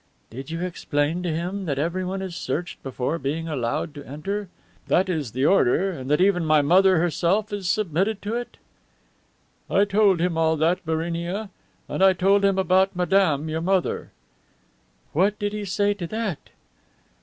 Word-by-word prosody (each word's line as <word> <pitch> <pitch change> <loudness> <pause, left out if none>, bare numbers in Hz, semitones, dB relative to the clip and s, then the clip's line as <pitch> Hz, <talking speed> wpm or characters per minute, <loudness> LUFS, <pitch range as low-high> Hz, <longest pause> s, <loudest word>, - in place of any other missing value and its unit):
"Did 135 +5 -8
you 165 +1 -4
explain 165 -2 -1
to 180 - -2
him 180 +5 -3
that 140 -5 -2
everybody 185 +5 -2
is 180 -3 -7
searched 170 +6 -4
before 135 +4 -3
being 160 +4 -3
allowed 145 +1 -2
to 145 -1 -9
enter, 195 +9 -5 0.4
that 185 +1 +2
it 180 - +1
is 145 -8 -4
the 130 +3 0
order, 190 +2 +3
and 135 -7 -7
that 150 - +3
even 185 -2 +3
my 155 -2 +3
mother 185 +4 +5
herself 175 +6 +1
has 200 -3 -3
submitted 200 +1 0
to 210 +2 -3
it?" 240 +1 -5 1.1
"I 200 +1 +3
told 200 -2 +3
him 170 -1 0
all 160 0 +2
that, 170 +5 +1
Barinia; 170 +5 -2 0.4
and - - -1
I 190 -1 +7
told 195 +2 +3
him 195 -1 +3
about 190 0 +2
madame 175 -4 +2
your 160 +1 -2
mother." 185 +1 0 1.0
"What 195 +6 +2
did 205 0 -2
he 210 -1 -4
say 205 +2 +1
to 185 -4 -6
that?" 215 -5 -4
180 Hz, 170 wpm, -24 LUFS, 160-195 Hz, 1.1 s, I